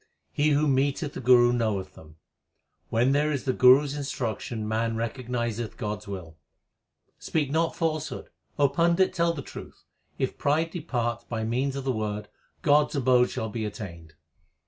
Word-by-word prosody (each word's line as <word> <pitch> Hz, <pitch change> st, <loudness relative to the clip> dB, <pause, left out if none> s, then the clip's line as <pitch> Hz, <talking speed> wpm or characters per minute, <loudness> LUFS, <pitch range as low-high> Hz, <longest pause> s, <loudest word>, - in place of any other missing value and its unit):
He 150 Hz, +1 st, +2 dB
who 150 Hz, +1 st, +3 dB
meeteth 140 Hz, +2 st, +1 dB
the -, -, -6 dB
Guru 120 Hz, 0 st, +5 dB
knoweth 105 Hz, -6 st, -1 dB
them. 75 Hz, -1 st, -15 dB, 0.7 s
When 120 Hz, +3 st, +2 dB
there 150 Hz, +2 st, +2 dB
is 140 Hz, -3 st, -2 dB
the 130 Hz, -, 0 dB
Guru 130 Hz, +3 st, +7 dB
s 140 Hz, -1 st, -4 dB
instruction 120 Hz, -5 st, -3 dB
man 115 Hz, +1 st, 0 dB
recognizeth 120 Hz, -1 st, -3 dB
God 105 Hz, -1 st, -3 dB
s 105 Hz, -, -16 dB
will. 90 Hz, -5 st, -7 dB, 0.8 s
Speak 145 Hz, -4 st, -1 dB
not 165 Hz, +2 st, +1 dB
falsehood; 155 Hz, -2 st, -3 dB, 0.3 s
O 145 Hz, -, +5 dB
Pandit, 170 Hz, +6 st, +2 dB
tell 170 Hz, -2 st, +2 dB
the 140 Hz, -4 st, -6 dB
truth, -, -, -11 dB, 0.3 s
If -, -, -2 dB
pride 160 Hz, +3 st, +1 dB
depart 120 Hz, -8 st, -3 dB
by 115 Hz, -2 st, -2 dB
means 130 Hz, +5 st, -1 dB
of 135 Hz, -, -4 dB
the 135 Hz, -, 0 dB
Word, 105 Hz, -2 st, -3 dB, 0.3 s
God 150 Hz, 0 st, +5 dB
s -, -, -7 dB
abode 125 Hz, -2 st, +4 dB
shall 110 Hz, -, -3 dB
be 110 Hz, +1 st, -4 dB
attained. 85 Hz, -7 st, -7 dB
125 Hz, 170 wpm, -27 LUFS, 110-145 Hz, 0.8 s, Guru